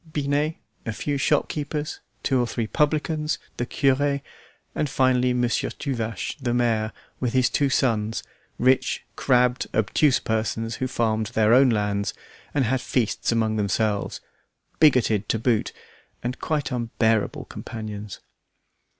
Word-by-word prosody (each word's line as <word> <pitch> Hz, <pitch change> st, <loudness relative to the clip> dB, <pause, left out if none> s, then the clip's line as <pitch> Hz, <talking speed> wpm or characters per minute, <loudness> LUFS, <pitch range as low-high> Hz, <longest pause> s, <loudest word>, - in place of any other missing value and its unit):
Binet, 145 Hz, +1 st, 0 dB, 0.3 s
a 115 Hz, -, -3 dB
few 140 Hz, +5 st, -2 dB
shopkeepers, 150 Hz, +2 st, -1 dB, 0.2 s
two 135 Hz, -2 st, +2 dB
or 120 Hz, -, 0 dB
three 115 Hz, 0 st, -2 dB
publicans, 150 Hz, +3 st, 0 dB, 0.2 s
the 120 Hz, -, -2 dB
cure, 140 Hz, +1 st, +2 dB, 0.5 s
and 150 Hz, -, -1 dB
finally, 130 Hz, -1 st, +3 dB
Monsieur 125 Hz, -1 st, +1 dB
Tuvache, 115 Hz, -, -3 dB
the 120 Hz, -2 st, 0 dB
mayor, 115 Hz, -3 st, +1 dB, 0.3 s
with 125 Hz, -2 st, -1 dB
his 130 Hz, -1 st, +3 dB
two 140 Hz, -2 st, +2 dB
sons, 115 Hz, -5 st, +1 dB, 0.3 s
rich, 130 Hz, +1 st, +2 dB
crabbed, 125 Hz, -1 st, +2 dB
obtuse 125 Hz, +6 st, +3 dB
persons, 115 Hz, +1 st, -2 dB
who 130 Hz, -, -1 dB
farmed 110 Hz, -3 st, 0 dB
their 110 Hz, -1 st, +3 dB
own 130 Hz, +1 st, +7 dB
lands 105 Hz, -2 st, 0 dB, 0.4 s
and 140 Hz, -3 st, +1 dB
had 130 Hz, +2 st, +1 dB
feasts 120 Hz, -2 st, 0 dB
among 110 Hz, -1 st, +1 dB
themselves, 105 Hz, 0 st, 0 dB, 0.6 s
bigoted 120 Hz, -8 st, +4 dB
to -, -, +2 dB
boot, 115 Hz, -1 st, +1 dB, 0.5 s
and 125 Hz, +2 st, -3 dB
quite 150 Hz, -3 st, -1 dB
unbearable 115 Hz, -3 st, 0 dB
companions. 105 Hz, -3 st, -7 dB
125 Hz, 130 wpm, -24 LUFS, 110-135 Hz, 0.6 s, own